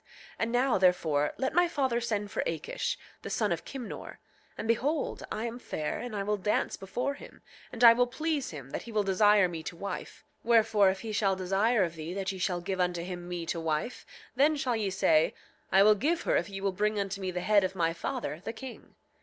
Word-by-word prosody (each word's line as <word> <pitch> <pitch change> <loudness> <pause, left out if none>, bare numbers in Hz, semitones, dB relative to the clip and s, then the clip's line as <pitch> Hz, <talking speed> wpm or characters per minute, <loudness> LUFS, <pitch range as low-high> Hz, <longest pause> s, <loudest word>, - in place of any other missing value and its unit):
8:10 - - -36 0.3
And 230 0 0
now, 250 +1 +3
therefore, 160 -5 +2
let 265 - -1
my 350 +2 +4
father 265 -7 0
send 210 -3 -2
for - - -1
Akish, 160 -2 -2 0.2
the - - -6
son - - 0
of - - -2
Kimnor; 260 -4 -7 0.4
and - - -4
behold, 275 +7 0
I 220 - -2
am 235 +1 -5
fair, 155 -10 -3
and 245 -3 -5
I 200 - -1
will 210 +1 0
dance 210 +2 0
before 245 +8 -3
him, 280 - -13 0.3
and 245 0 -3
I 230 -1 +11
will 245 +1 +2
please 295 +3 -2
him, 135 -4 -9
that - - -3
he 235 - -10
will 215 -2 +1
desire 200 0 +4
me 170 -2 -5
to 170 +2 -6
wife; 200 +2 -6 0.2
wherefore 220 -4 +4
if 190 0 -2
he 225 - -5
shall 200 -2 +2
desire 195 +4 +2
of 170 -2 -2
thee 165 +2 -6
that 195 -1 -2
ye 190 - -7
shall 180 -1 0
give 185 +2 -3
unto 180 -1 0
him 175 -1 -6
me 175 -1 -4
to 165 - -2
wife, 160 +8 -2 0.3
then 290 +4 +4
shall 255 -4 0
ye 210 -3 -1
say: 160 -4 +3 0.4
I 195 +1 +6
will 215 +1 +7
give 310 - 0
her - - +1
if - - 0
ye 195 -1 -6
will 195 0 +1
bring 210 +2 0
unto 195 0 -3
me 190 - -2
the 180 0 -3
head 205 +1 +4
of 190 +1 -2
my 165 -2 +1
father, 175 - -4
the 225 - -4
king. 255 +1 -10
200 Hz, 230 wpm, -29 LUFS, 180-235 Hz, 0.4 s, I